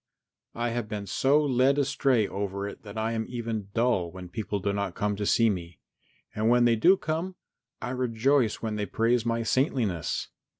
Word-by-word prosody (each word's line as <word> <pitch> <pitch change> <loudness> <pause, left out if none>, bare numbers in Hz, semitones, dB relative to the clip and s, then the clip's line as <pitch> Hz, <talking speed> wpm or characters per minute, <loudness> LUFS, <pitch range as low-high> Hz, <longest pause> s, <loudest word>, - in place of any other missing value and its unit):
I 120 +1 -1
have 115 -1 -3
been 105 -2 -4
so 135 +9 +3
led 135 +1 +3
astray 135 -5 +2
over 100 0 -3
it 100 - -9
that 105 0 -10
I 110 +1 0
am 110 -1 -1
even 115 -4 -4
dull 115 -7 +2
when 90 0 -9
people 105 +1 -3
do 100 +1 -1
not 100 -3 -2
come 105 0 -1
to 105 -1 -2
see 115 - +4
me, 90 -5 -3 0.6
and 110 +1 +1
when 120 0 +5
they 120 -1 +4
do 180 - +5
come, 170 +3 -3 0.5
I 125 - -3
rejoice 125 -1 +1
when 110 -1 -2
they 105 -1 -2
praise 115 +1 +1
my 115 0 0
saintliness. 115 - 0
115 Hz, 185 wpm, -27 LUFS, 100-125 Hz, 0.6 s, when